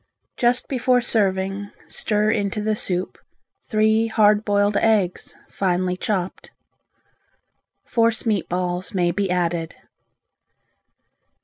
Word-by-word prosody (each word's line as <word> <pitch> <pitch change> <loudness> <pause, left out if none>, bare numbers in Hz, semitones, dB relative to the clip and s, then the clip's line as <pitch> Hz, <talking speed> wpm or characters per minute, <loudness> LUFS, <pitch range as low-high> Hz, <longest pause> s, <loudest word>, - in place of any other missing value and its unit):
Just 245 0 +1
before 255 -1 +2
serving 195 -3 0 0.2
stir 210 0 0
into 205 -1 -1
the 215 0 0
soup 180 -3 -2 0.5
three 220 +1 +3
hard 215 -1 +3
boiled 205 -1 +1
eggs, 205 -5 +1
finely 180 -1 -1
chopped. 185 -1 -3 1.4
Force 230 -1 +1
meat 210 -5 0
balls 180 +1 -3
may 175 -2 +2
be 195 +2 -1
added. 170 -2 -1
205 Hz, 100 wpm, -22 LUFS, 185-220 Hz, 1.4 s, three